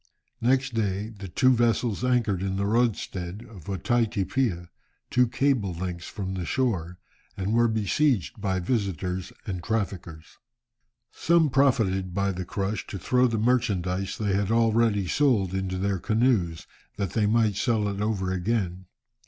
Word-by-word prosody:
Next 130 +2 +2
day, 105 -1 -1
the 100 -3 -9
two 130 +9 +3
vessels 120 -1 +1
anchored 120 -7 +1
in 95 0 -2
the 100 +1 -1
roadstead 105 -4 -1
of 100 -9 -13
Otaiti 105 +1 0
Piha, 95 -8 -1 0.4
two 125 0 +4
cable 115 -7 +1
lengths 90 0 -5
from 95 -2 -5
the 95 -1 -3
shore, 90 -7 -1 0.4
and 100 +2 -1
were 120 +1 +4
besieged 110 - 0
by 95 -2 0
visitors 95 - -2
and 95 -5 -4
traffickers. 90 -7 -4 0.7
Some 165 -3 +2
profited 105 -10 +2
by 100 0 +1
the 90 -1 -5
crush 100 +3 -3
to 100 - -5
throw 125 +7 +2
the 115 -2 -1
merchandize 100 -5 0
they 105 -3 0
had 100 0 0
already 115 -3 +2
sold 110 -8 +2
into 95 -1 -2
their 100 0 -1
canoes, 105 -5 +1 0.3
that 100 -4 -2
they 105 0 +1
might 110 -2 +2
sell 110 0 +1
it 100 0 -3
over 100 -3 -1
again. 95 -2 -2
100 Hz, 150 wpm, -26 LUFS, 95-115 Hz, 0.7 s, two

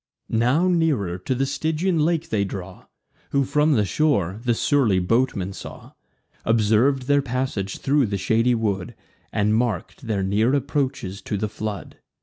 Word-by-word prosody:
Now 125 +10 +2
nearer 150 - +1
to 125 +8 -2
the 135 +2 +1
Stygian 160 +5 0
lake 165 +1 +1
they 105 -2 +1
draw: 95 -1 -7 0.4
Whom, 140 0 +2
from 150 +3 +2
the 105 -6 +2
shore, 100 - +1
the 120 -2 +1
surly 120 -7 +2
boatman 100 0 0
saw; - - -10 0.5
Observ'd 115 +4 +3
their 145 +2 +3
passage 125 -7 -3
thro' 140 0 +2
the 100 -1 -2
shady 115 +6 +2
wood, 100 -5 -2 0.4
And 105 +1 +1
mark'd 115 - -2
their 100 -3 0
near 110 +7 +2
approaches 130 -9 -2
to 105 - -3
the 105 +2 -1
flood. 105 -1 -6
115 Hz, 150 wpm, -23 LUFS, 100-140 Hz, 0.5 s, Observ'd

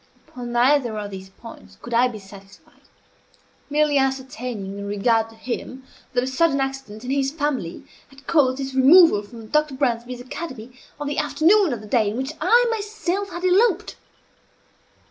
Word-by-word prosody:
Upon 245 -1 -7
neither 240 -1 +2
of 205 -1 -5
these 190 0 -9
points 190 - -14
could 240 - -8
I 240 +2 +4
be 235 -3 -7
satisfied 195 -1 -16 0.9
merely 295 -1 +2
ascertaining, 250 -7 -3
in 200 - -6
regard 225 +2 +1
to 225 - -16
him, 255 +3 -6 0.3
that 245 -1 +1
a - - -1
sudden 275 +2 +1
accident 270 -5 -4
in 255 - -3
his 275 -1 +1
family 280 - -3 0.2
had 270 0 -18
caused 260 -5 +2
his 270 -1 -5
removal 275 - +6
from 225 +2 -12
Dr. 300 -2 +1
Bransby's 245 -2 -1
academy 255 -3 -8 0.3
on 295 - -4
the 290 +1 -2
afternoon 370 +2 +3
of 235 -4 -4
the 215 - -11
day 215 -2 +2
in 215 - -4
which 265 +4 -3
I 485 +1 +5
myself 405 -3 -3
had 350 -1 -7
eloped. 395 +1 +2
260 Hz, 165 wpm, -22 LUFS, 225-295 Hz, 0.9 s, removal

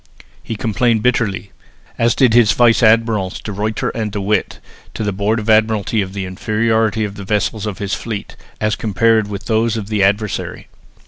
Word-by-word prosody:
He 115 - -5
complained 115 0 0
bitterly, 110 -5 0 0.5
as 115 0 +2
did 125 -4 +3
his 120 -3 +5
vice 120 -1 +4
admirals 110 -4 +2
De 105 - -6
Ruyter 105 +2 -2
and 110 -2 -3
De 105 - -4
With, 105 +2 -1 0.4
to - - -3
the 105 - -1
Board 100 +3 0
of 110 -1 -5
Admiralty 110 -1 +2
of 95 -1 -5
the 100 -1 -4
inferiority 110 +3 0
of 100 0 -7
the 100 - -7
vessels 105 +2 -1
of 105 - -4
his 100 -1 -3
fleet, 110 -3 -5 0.2
as 110 0 0
compared 110 +1 +2
with 100 +1 -6
those 115 0 +1
of 105 -2 -5
the 105 -2 0
adversary. 105 +2 -1
110 Hz, 185 wpm, -17 LUFS, 100-115 Hz, 0.5 s, his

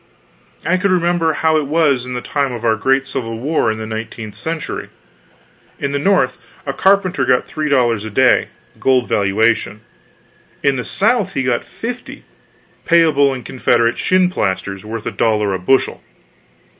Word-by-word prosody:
I 185 +2 +2
could 200 +2 0
remember 175 -2 +2
how 160 +1 +2
it 150 -2 -1
was 140 -5 +1
in 125 - -5
the 125 - -3
time 140 -2 -1
of 120 -1 -5
our 110 -1 +3
great 135 +5 +1
civil 115 -4 -4
war 135 -2 0
in 110 - -4
the 110 - -5
nineteenth 110 -1 -6
century. 160 +10 -5 0.9
In 140 - -2
the 140 - -1
North 145 -7 +1 0.3
a 140 - -2
carpenter 190 -4 +2
got 125 -1 +2
three 155 -1 -3
dollars 120 -6 +2
a 110 - -5
day, 130 +4 +3 0.3
gold 130 -2 +2
valuation; 105 +1 +1 0.8
in 140 - +3
the 125 - -3
South 205 -1 +1
he 135 - 0
got 125 -2 0
fifty 245 +2 -7 0.6
payable 155 -5 +4
in 130 -2 -5
Confederate 120 -2 +1
shinplasters 100 - 0
worth 110 0 -6
a - - -2
dollar 105 -3 +1
a 95 - -2
bushel. 130 +9 +1
130 Hz, 160 wpm, -17 LUFS, 115-160 Hz, 0.9 s, payable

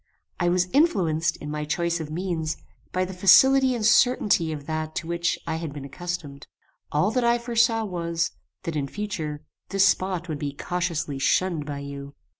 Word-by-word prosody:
I 175 -1 +2
was 180 +1 +2
influenced, 175 - +2
in 150 - -7
my 150 0 -3
choice 170 +2 -1
of 155 -2 -5
means, 160 -2 -2 0.3
by 185 0 0
the 190 - -7
facility 260 +8 +6
and 220 -3 -2
certainty 210 -7 +4
of 145 -2 -6
that 155 0 -3
to 165 - -3
which 170 0 0
I 160 - -2
had 165 -2 -5
been 145 -2 -7
accustomed. 150 -2 -6 0.4
All 180 +8 +2
that 250 +1 +1
I 235 0 +4
forsaw 230 -1 +2
was, 170 -3 -2 0.3
that, 165 - -4
in 140 -2 -1
future, 160 -7 -4 0.3
this 195 0 +4
spot 185 -2 0
would 155 -3 -4
be 145 -2 -3
cautiously 170 -6 -2
shunned 165 +1 +1
by 140 -1 -4
you. 140 0 -8
170 Hz, 180 wpm, -25 LUFS, 155-190 Hz, 0.4 s, facility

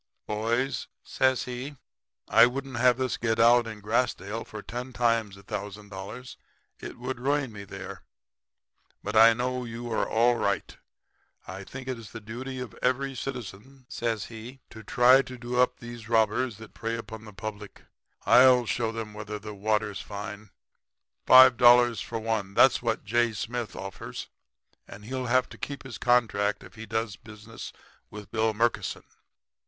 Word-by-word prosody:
"'Boys,' 115 +5 -1 0.2
says 130 -1 +1
he, 125 +3 -6 0.5
'I 115 +1 +7
wouldn't 135 0 -5
have 125 0 +4
this 130 -2 -1
to - - -4
get 115 -1 0
out 120 +1 +6
in 110 -2 -8
Grassdale 110 -1 -1
for 105 -1 -9
ten 125 +2 -6
times 115 -5 +1
a 100 - -15
thousand 105 0 -6
dollars. 100 +6 -8 0.4
It - - -8
would 125 0 -5
ruin 140 0 0
me 100 -1 -8
there. - - -8 1.0
But 105 - -4
I 115 +1 +8
know 125 +2 -2
you 120 0 -6
all - - +1
are - - -1
all 120 +2 +3
right. 100 -3 -1 0.7
I 95 +1 -7
think 130 +5 -9
it's 115 -4 -5
the - - -8
duty 120 +5 -7
of 125 -2 -6
every 135 +2 0
citizen,' 125 0 -7
says 115 -5 -2
he, 120 +4 -10
'to 110 - -10
try 125 +5 +5
to 130 -1 -9
do 120 +1 -3
up 125 - +2
these 120 -2 -10
robbers 110 +1 +2
that 110 -1 -12
prey 115 +1 -3
upon 110 -1 -8
the 105 - -10
public. 105 0 -8 0.4
I'll 125 -1 +7
show 115 0 -1
'em 110 -2 -5
whether 105 0 -6
the 105 +1 -8
water's 105 0 -1
fine. 105 0 -7 0.8
Five 130 -1 +9
dollars 120 -2 +6
for 115 - -5
one 110 -3 -2
that's 135 - +5
what 115 -3 -2
J. 120 +2 +2
Smith 115 +2 -4
offers, 95 0 -7 0.6
and 105 +1 -11
he'll 130 +1 -3
have 130 +1 +3
to - - -13
keep 140 -2 -6
his 125 -6 -8
contract 110 -4 +2
if - - -14
he 110 0 -9
does 110 -2 -2
business 110 +1 -10 0.4
with 105 -1 -10
Bill 110 -1 +1
Murkison.' 115 +2 0
115 Hz, 170 wpm, -27 LUFS, 105-125 Hz, 1.0 s, Five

